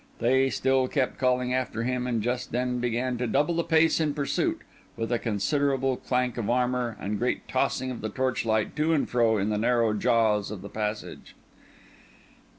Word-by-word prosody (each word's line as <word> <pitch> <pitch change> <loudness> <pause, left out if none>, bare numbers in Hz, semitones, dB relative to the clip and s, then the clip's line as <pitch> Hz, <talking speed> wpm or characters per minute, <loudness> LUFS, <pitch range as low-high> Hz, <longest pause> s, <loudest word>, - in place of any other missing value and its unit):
They 130 +3 +3
still 130 +1 +1
kept 130 -1 -1
calling 125 -1 +1
after 125 -3 -1
him, 125 0 -1
and 115 -4 -1
just 125 +1 -2
then 125 +1 -1
began 120 +1 -1
to 125 - -1
double 145 +8 +1
the 170 0 0
pace 165 -1 +3
in 150 -3 0
pursuit, 140 -2 -1 0.4
with 115 +1 -3
a 120 - +1
considerable 135 +4 0
clank 125 -1 -1
of 110 - -2
armour, 125 -1 0
and 105 +1 -3
great 125 +1 -1
tossing 130 0 0
of 125 - -6
the 110 - -3
torchlight 115 -4 -1
to 155 +2 +2
and 150 - +1
fro 115 -2 +2
in 100 +1 0
the 105 -1 0
narrow 115 -1 +2
jaws 105 -2 +2
of 100 -3 -7
the 100 - -8
passage. 105 0 -5
125 Hz, 180 wpm, -27 LUFS, 115-130 Hz, 0.4 s, They